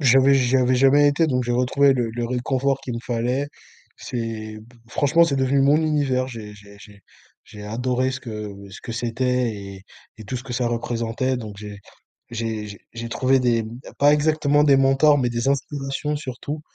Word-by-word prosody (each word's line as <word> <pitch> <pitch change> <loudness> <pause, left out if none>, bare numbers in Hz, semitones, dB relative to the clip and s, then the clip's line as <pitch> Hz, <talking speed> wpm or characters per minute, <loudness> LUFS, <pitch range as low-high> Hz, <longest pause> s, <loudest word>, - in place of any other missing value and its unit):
j'avais 135 0 +5
j'avais 130 -1 +3
jamais 135 +3 +5
été 145 +3 +2
donc 125 -2 +1
j'ai 120 - -1
retrouvé 130 +3 +3
le 120 -3 -1
le 120 +1 -3
réconfort 130 +3 0
qu'il 125 -3 -5
me - - -3
fallait, 125 +4 -1 0.5
c'est 110 -3 -5
b 115 +3 -18 0.2
franchement 150 +6 +3
c'est 140 -5 -1
devenu 135 +1 +2
mon 140 +2 +5
univers. 145 -5 +1
J'ai 110 -4 -8
j'ai 100 0 -15
j'ai 100 0 -15 0.4
j'ai 105 - -12
adoré 125 +4 -1
ce 130 0 -5
que 105 -3 -6 0.2
ce - - -11
que 115 - -6
c'était 120 +1 -1
et 100 -1 -9 0.4
et 110 - -9
tout 125 +5 -4
ce 125 - -6
que 125 - -7
ça 125 0 0
représentait 120 +2 -2
donc 105 -4 -8
j'ai 105 -1 -8 0.5
j'ai 110 -2 -3
j'ai 100 -1 -10
j'ai 115 0 -6
trouvé 130 +3 +2
des 115 -3 +1 0.3
pas 145 +1 +6
exactement 150 -1 +2
des 140 -2 +5
mentors, 135 +2 +4
mais 125 -3 +1
des 120 +1 -2
inspirations 140 +1 -2
surtout, 145 +2 -6
125 Hz, 185 wpm, -22 LUFS, 115-135 Hz, 0.5 s, pas